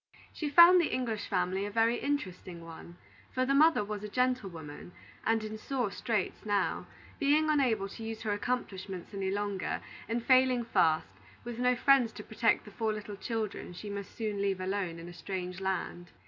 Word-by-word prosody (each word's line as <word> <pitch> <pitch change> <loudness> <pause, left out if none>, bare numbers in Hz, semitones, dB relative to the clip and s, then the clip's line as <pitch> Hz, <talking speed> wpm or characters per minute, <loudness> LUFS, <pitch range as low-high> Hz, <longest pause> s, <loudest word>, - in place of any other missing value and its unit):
She 300 - -3
found 345 +4 +9
the 340 - -1
English 230 -5 -2
family 185 +1 0
a 205 - -2
very 230 +3 +2
interesting 185 - -3
one, 165 +1 -11 0.4
for 255 0 +2
the 275 - +1
mother 310 -4 +5
was 210 0 -5
a 210 - -5
gentlewoman, 195 - -2 0.3
and 225 0 +2
in 215 0 -6
sore 245 -4 -2
straits 205 -1 -2
now, 205 -2 0 0.3
being 305 +1 +3
unable 240 -9 +2
to 225 - -9
use 225 0 -5
her 210 -2 0
accomplishments 200 -4 -4
any 195 -1 -2
longer, 200 -1 -2 0.3
and 230 +1 -1
failing 255 -2 +4
fast, 160 -8 +3 0.4
with 240 0 -6
no 250 0 +3
friends 255 -2 +4
to 210 - -8
protect 225 +2 +1
the 210 - -11
four 220 +1 -1
little 210 -1 -6
children 215 -3 -4
she 205 +4 -7
must 200 -1 -6
soon 210 -3 -2
leave 195 -2 0
alone 185 -2 -2
in 165 +1 -9
a 175 - -9
strange 180 0 -5
land. 190 -2 -3
210 Hz, 180 wpm, -31 LUFS, 190-245 Hz, 0.4 s, found